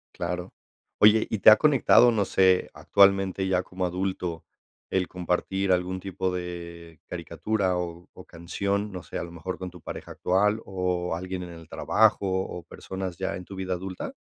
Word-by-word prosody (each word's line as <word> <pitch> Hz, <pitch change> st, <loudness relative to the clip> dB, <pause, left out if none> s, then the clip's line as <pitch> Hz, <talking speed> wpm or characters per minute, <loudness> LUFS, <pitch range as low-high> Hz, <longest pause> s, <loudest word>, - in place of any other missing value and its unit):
Claro, 90 Hz, 0 st, -4 dB, 0.5 s
oye, 105 Hz, +1 st, +6 dB
¿y 110 Hz, -, -2 dB
te 95 Hz, -, +9 dB
ha 110 Hz, -, +10 dB
conectado, 125 Hz, -3 st, +5 dB
no 105 Hz, -3 st, +1 dB
sé, 95 Hz, -1 st, +3 dB
actualmente 95 Hz, -1 st, +3 dB
ya 95 Hz, -1 st, +1 dB
como 95 Hz, 0 st, -4 dB
adulto, 90 Hz, -2 st, -3 dB, 0.5 s
el 95 Hz, -1 st, 0 dB
compartir 90 Hz, +2 st, -1 dB
algún 90 Hz, +1 st, 0 dB
tipo 95 Hz, -1 st, -3 dB
de 85 Hz, -2 st, -7 dB
caricatura 100 Hz, -4 st, -2 dB
o 85 Hz, -1 st, -6 dB
o -, -, -13 dB
canción?, 100 Hz, +5 st, -3 dB
no 90 Hz, -2 st, -7 dB
sé, -, -, -7 dB
¿a -, -, -3 dB
lo 85 Hz, -, -8 dB
mejor 85 Hz, +2 st, -6 dB
con 95 Hz, -, -5 dB
tu 90 Hz, -1 st, -14 dB
pareja -, -, -8 dB
actual, 105 Hz, +4 st, +1 dB
o 90 Hz, -2 st, -2 dB
alguien 90 Hz, +1 st, -5 dB
en 90 Hz, -, -8 dB
el 80 Hz, -1 st, -12 dB
trabajo, 105 Hz, -2 st, +2 dB
o 95 Hz, -2 st, -2 dB
personas 95 Hz, +1 st, -6 dB
ya 95 Hz, 0 st, -2 dB
en 90 Hz, -, -8 dB
tu 95 Hz, -, -10 dB
vida 95 Hz, -1 st, -3 dB
adulta? 95 Hz, +1 st, -6 dB
95 Hz, 175 wpm, -26 LUFS, 90-95 Hz, 0.5 s, ha